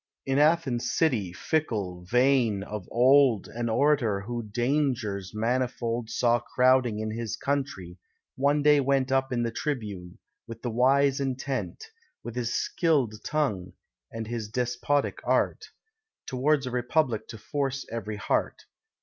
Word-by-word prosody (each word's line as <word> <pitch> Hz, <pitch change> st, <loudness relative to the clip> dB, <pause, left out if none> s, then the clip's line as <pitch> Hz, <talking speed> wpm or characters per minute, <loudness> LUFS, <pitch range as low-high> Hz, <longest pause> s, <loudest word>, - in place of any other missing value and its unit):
In 135 Hz, +1 st, +1 dB
Athens' 150 Hz, -6 st, +2 dB
city, 115 Hz, -, +1 dB
fickle, 100 Hz, -, -2 dB
vain, 125 Hz, -2 st, +2 dB
of 105 Hz, -2 st, -7 dB
old, 130 Hz, -2 st, +4 dB
An 120 Hz, 0 st, -3 dB
Orator, 120 Hz, -5 st, +2 dB
who 120 Hz, +3 st, -4 dB
dangers 120 Hz, -4 st, -1 dB
manifold 120 Hz, 0 st, -1 dB
Saw 120 Hz, +1 st, +2 dB
crowding 125 Hz, -2 st, +2 dB
on 110 Hz, -, -3 dB
his 115 Hz, -1 st, -3 dB
country, 115 Hz, -11 st, -3 dB, 0.4 s
one 145 Hz, +2 st, +2 dB
day 150 Hz, 0 st, +6 dB
went 135 Hz, -1 st, +1 dB
Up 135 Hz, 0 st, +1 dB
in 120 Hz, -1 st, 0 dB
the 115 Hz, -, -1 dB
tribune, 105 Hz, -, -4 dB, 0.3 s
with 115 Hz, 0 st, -9 dB
the 120 Hz, -, -2 dB
wise 135 Hz, +3 st, +3 dB
intent, 135 Hz, -, -3 dB, 0.4 s
With 120 Hz, -, -6 dB
his 120 Hz, -1 st, -2 dB
skill'd 135 Hz, -11 st, 0 dB
tongue, 135 Hz, -13 st, -1 dB, 0.4 s
and 115 Hz, 0 st, -5 dB
his 115 Hz, -2 st, -5 dB
despotic 125 Hz, +4 st, -1 dB
art, -, -, 0 dB, 0.6 s
Towards 140 Hz, +2 st, +1 dB
a 125 Hz, -, -4 dB
republic 125 Hz, -1 st, 0 dB
to 110 Hz, -, -8 dB
force 140 Hz, +4 st, -3 dB
every 105 Hz, -2 st, -4 dB
heart. 105 Hz, -, -1 dB
125 Hz, 135 wpm, -27 LUFS, 110-140 Hz, 0.6 s, day